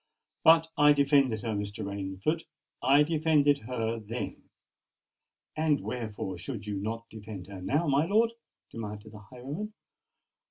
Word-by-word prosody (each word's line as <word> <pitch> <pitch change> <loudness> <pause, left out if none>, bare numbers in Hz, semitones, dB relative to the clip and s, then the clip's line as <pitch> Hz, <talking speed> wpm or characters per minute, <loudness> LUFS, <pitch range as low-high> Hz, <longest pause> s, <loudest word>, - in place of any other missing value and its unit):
"But 160 0 +7
I 145 0 +8
defended 140 -5 +3
her, 115 - -2
Mr. 100 -1 -3
Rainford—I 100 - 0
defended 150 -2 +3
her 115 -2 -2
then——" 115 +3 -6 1.1
"And 155 -2 +2
wherefore 105 -6 -4
should 110 0 -6
you 105 -1 -3
not 115 +3 -4
defend 105 -4 -8
her 95 -1 -9
now, 145 - +1
my 145 +3 +3
lord?" 225 +4 +3 0.4
demanded 105 -1 -7
the 105 - -11
highwayman. 135 - -7
120 Hz, 125 wpm, -29 LUFS, 105-145 Hz, 1.1 s, I